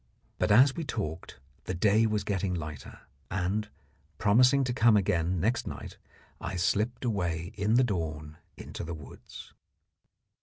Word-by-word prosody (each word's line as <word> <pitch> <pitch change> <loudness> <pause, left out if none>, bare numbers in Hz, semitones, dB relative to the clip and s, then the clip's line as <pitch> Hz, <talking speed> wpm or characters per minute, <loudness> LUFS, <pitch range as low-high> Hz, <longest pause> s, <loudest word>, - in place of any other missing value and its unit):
But - - +1
as 130 +5 +6
we 165 - -3
talked 85 - -5 0.3
the 95 - -3
day 105 +4 +3
was 105 -2 -1
getting 95 -2 -1
lighter, 75 -4 -7 0.3
and, 95 +3 -1 0.5
promising 125 +6 +4
to 125 -1 -1
come 115 -2 +5
again 90 -3 0
next 115 +8 0
night, - - -8 0.4
I - - -5
slipped 105 +8 0
away 90 -5 -2
in 105 +1 +1
the 130 - +5
dawn 80 -8 -3 0.2
into - - -7
the 85 0 -5
woods. 75 -3 -12
100 Hz, 145 wpm, -29 LUFS, 85-115 Hz, 0.5 s, as